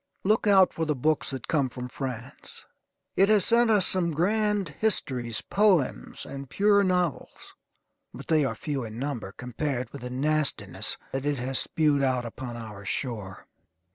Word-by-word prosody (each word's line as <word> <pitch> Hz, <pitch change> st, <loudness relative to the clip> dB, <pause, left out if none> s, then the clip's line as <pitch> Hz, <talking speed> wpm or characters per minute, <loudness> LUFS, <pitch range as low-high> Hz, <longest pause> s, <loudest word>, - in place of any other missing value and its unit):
Look 215 Hz, +2 st, +2 dB
out 190 Hz, -2 st, +5 dB
for 165 Hz, -, -2 dB
the 150 Hz, -1 st, 0 dB
books 155 Hz, +4 st, 0 dB
that 130 Hz, -4 st, -6 dB
come 140 Hz, -5 st, +1 dB
from 125 Hz, 0 st, -6 dB
France. 125 Hz, -1 st, -7 dB, 0.5 s
It 195 Hz, +2 st, +4 dB
has 210 Hz, -3 st, +4 dB
sent 235 Hz, 0 st, +4 dB
us 205 Hz, -4 st, +5 dB
some 175 Hz, -3 st, +2 dB
grand 205 Hz, +2 st, +1 dB
histories, 130 Hz, -, -1 dB
poems, 195 Hz, -9 st, +1 dB
and 135 Hz, -1 st, -8 dB
pure 200 Hz, +3 st, +3 dB
novels, 180 Hz, -6 st, -2 dB, 0.6 s
but -, -, -10 dB
they 155 Hz, -2 st, +3 dB
are 130 Hz, -5 st, -1 dB
few 140 Hz, +3 st, -3 dB
in 110 Hz, -1 st, -8 dB
number 125 Hz, -7 st, -4 dB
compared 125 Hz, +3 st, -4 dB
with 140 Hz, -, -9 dB
the 125 Hz, -, -5 dB
nastiness 150 Hz, +4 st, 0 dB
that 135 Hz, +1 st, -3 dB
it 145 Hz, -1 st, 0 dB
has 130 Hz, +2 st, +1 dB
spewed 150 Hz, -3 st, +1 dB
out 130 Hz, -2 st, +1 dB
upon 120 Hz, +1 st, -7 dB
our 105 Hz, -3 st, -9 dB
shore. 105 Hz, -2 st, -4 dB
140 Hz, 165 wpm, -27 LUFS, 125-185 Hz, 0.6 s, out